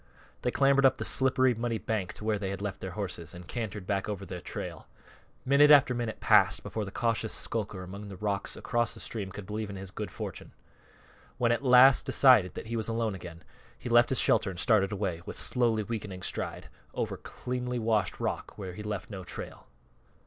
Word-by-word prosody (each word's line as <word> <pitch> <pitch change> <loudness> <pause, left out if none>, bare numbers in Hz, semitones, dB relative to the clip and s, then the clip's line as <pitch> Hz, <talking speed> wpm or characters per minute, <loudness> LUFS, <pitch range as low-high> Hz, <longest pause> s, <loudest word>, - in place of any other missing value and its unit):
They - - 0
clambered 140 +2 +3
up 135 - +5
the - - -4
slippery, 130 -1 +3
muddy 115 0 -2
bank 105 -5 -3
to - - -11
where 110 -1 0
they 95 -2 -3
had 95 -1 -4
left 100 -1 -5
their 95 - -4
horses, 90 -5 -5
and 90 -1 -11
cantered 105 -5 -5
back 100 +1 -1
over 100 -2 -4
their 90 -1 -7
trail. - - -7 0.6
Minute 140 +3 +6
after 145 -3 +7
minute 120 -3 -3
passed - - +4
before 110 -2 -4
the 95 - -8
cautious 115 -1 -1
skulker 105 -4 -3
among 100 +3 -8
the 100 -2 -9
rocks 100 0 -2
across 120 -2 -1
the - - -11
stream 100 -4 -5
could 100 +1 -8
believe 105 +1 -4
in 100 - -6
his 95 -1 -8
good 105 -1 -5
fortune. - - -7 0.8
When 120 -2 +2
he - - +5
at 120 - -2
last 130 +1 +7
decided 115 -10 +5
that - - -6
he 115 +1 -4
was 110 -2 -1
alone 115 -2 -1
again 85 -2 -9 0.3
he - - -7
left 120 0 +5
his 130 - +1
shelter - - +3
and 90 -2 -7
started 105 -2 +3
away, 95 -5 -2
with - - -6
slowly 115 -4 +1
weakening 105 -4 -5
stride, - - -4 0.3
over - - -2
cleanly 125 0 -4
washed 110 -4 0
rock - - -3
where 95 -3 -6
he 105 - -8
left 105 0 -5
no 95 -2 -6
trail. 90 - -8
105 Hz, 205 wpm, -29 LUFS, 95-120 Hz, 0.8 s, after